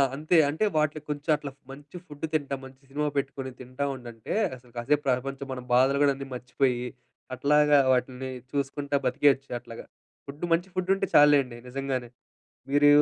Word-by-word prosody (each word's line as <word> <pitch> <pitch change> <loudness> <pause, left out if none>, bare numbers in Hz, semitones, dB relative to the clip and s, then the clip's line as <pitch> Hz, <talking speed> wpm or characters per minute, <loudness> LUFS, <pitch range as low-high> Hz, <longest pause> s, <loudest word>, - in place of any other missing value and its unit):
అంతే. 155 +4 +2
అంటే 160 +9 0
వాటిలికి 155 0 0
కొంచెం 150 +2 -2
అట్లా 140 -2 -7 0.2
మంచి 145 +4 -13
ఫుడ్డు 145 +1 -6
తింటా, 145 -3 0
మంచి 130 0 -14
సినిమా 150 +2 -1
పెట్టుకొని 135 -1 -3
తింటా 130 +3 -4
ఉండంటే, 120 -3 -7 0.2
అసలు 125 -1 -18
కాసేపు 145 +5 +1
ప్రపంచం, 135 +2 -1
మన 125 - -6
బాధలు 135 +3 +4
గోడన్నీ 140 -1 +2
మర్చిపోయి, 125 0 0 0.5
అట్లాగా 150 +3 +4 0.2
వాటిని 130 +1 -2 0.2
చూసుకుంటా 140 0 -2
బతికేయచ్చు 135 +1 +2
అట్లాగా. 115 -1 -10 0.4
ఫుడ్డు, 145 +5 -5
మంచి 175 +3 +1
ఫుడ్డుంటే 190 +1 +1
చాల్లేండి 145 -5 +5
నిజంగానే. 130 -1 -3 0.6
మీరూ 145 +1 +5
140 Hz, 145 wpm, -27 LUFS, 130-145 Hz, 0.6 s, చాల్లేండి